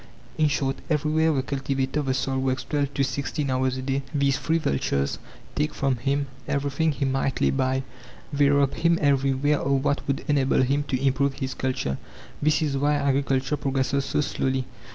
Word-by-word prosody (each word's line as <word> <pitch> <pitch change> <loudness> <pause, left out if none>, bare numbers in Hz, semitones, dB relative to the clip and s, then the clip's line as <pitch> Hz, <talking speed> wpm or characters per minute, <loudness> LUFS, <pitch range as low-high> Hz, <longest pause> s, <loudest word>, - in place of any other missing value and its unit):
In 155 - +3
short, 135 -2 0
everywhere 155 +1 +2
the 135 -3 0
cultivator 135 +1 -1
of 145 - -3
the 130 - +1
soil 135 0 -1
works 130 0 -1
twelve 145 -2 -1
to 140 - +2
sixteen 140 +1 -2
hours 130 0 0
a 130 - -4
day; 135 +1 0
these 140 -1 +2
three 165 +1 +1
vultures 70 - -1 0.3
take 150 +1 -1
from 135 -2 0
him 140 +4 0 0.2
everything 140 +3 0
he 140 -1 -2
might 135 0 0
lay - - +3
by; 130 0 0 0.5
they 140 0 +4
rob 140 -1 +3
him 170 0 +2
everywhere 140 0 +2
of 135 0 +1
what 145 - +1
would 140 -1 -1
enable 135 -3 +3
him 140 +3 +1
to 130 - 0
improve 135 +1 +1
his 130 -1 -3
culture. 130 - -2 0.4
This 155 +1 +2
is 145 -3 0
why 145 +2 +2
agriculture 135 0 +1
progresses 135 0 0
so - - 0
slowly. 130 -2 -1
140 Hz, 185 wpm, -25 LUFS, 130-145 Hz, 0.5 s, they